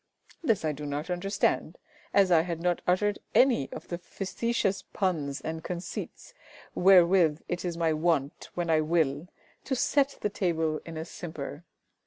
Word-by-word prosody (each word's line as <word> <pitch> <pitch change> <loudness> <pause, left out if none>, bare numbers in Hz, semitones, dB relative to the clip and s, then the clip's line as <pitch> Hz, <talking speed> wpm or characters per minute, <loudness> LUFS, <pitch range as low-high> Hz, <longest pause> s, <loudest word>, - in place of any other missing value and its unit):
This 225 - +1
I 155 - +1
do 150 0 -6
not 145 +5 -3
understand, 195 +3 0 0.3
as 195 -2 +4
I 165 -2 +6
had 170 -1 -4
not 175 0 0
uttered 205 +3 +2 0.2
any 245 - +4
of - - -9
the 175 - -3
facetious 195 +2 -2
puns 155 -8 -1
and 160 0 -5
conceits 180 - -6 0.4
wherewith 175 -4 +5
it 175 - -3
is 175 -2 -3
my 165 -2 +2
wont 155 -3 0
when 175 -2 -1
I 155 -1 +4
will 155 -1 +1 0.4
to 265 - -1
set 280 +1 +2
the 210 - 0
table 165 -5 0
in 165 -1 -7
a 160 - -4
simper. 155 -2 -7
175 Hz, 160 wpm, -28 LUFS, 155-190 Hz, 0.4 s, I